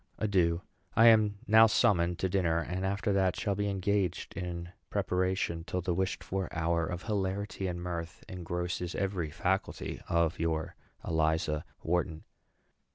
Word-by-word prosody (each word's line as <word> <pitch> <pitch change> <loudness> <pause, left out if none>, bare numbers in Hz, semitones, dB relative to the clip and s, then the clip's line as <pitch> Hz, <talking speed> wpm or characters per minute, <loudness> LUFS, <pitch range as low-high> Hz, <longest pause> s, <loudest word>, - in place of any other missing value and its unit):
Adieu. 90 -4 +1 0.3
I 115 +1 +8
am 105 -2 +4
now 110 +1 +7
summoned 90 -5 +3
to 95 - 0
dinner, 90 -3 +1
and 90 +2 -3
after 100 +1 0
that 95 -2 +2
shall 100 -1 0
be 100 +1 -1
engaged 95 -2 -1
in 85 -2 -4 0.2
preparation 95 -3 0
till 90 +1 -3
the 90 0 -1
wished 95 +2 -1
for 95 -1 -2
hour 85 -1 0
of 90 0 -4
hilarity 100 -1 -2
and 90 -1 -3
mirth 85 -2 -5
engrosses 90 0 -3
every 95 -5 -1
faculty 95 +5 -2
of 85 0 +1
your 80 -1 -1 0.3
ELIZA 80 -1 +1 0.2
WHARTON. 85 -1 -1
90 Hz, 145 wpm, -31 LUFS, 85-100 Hz, 0.3 s, I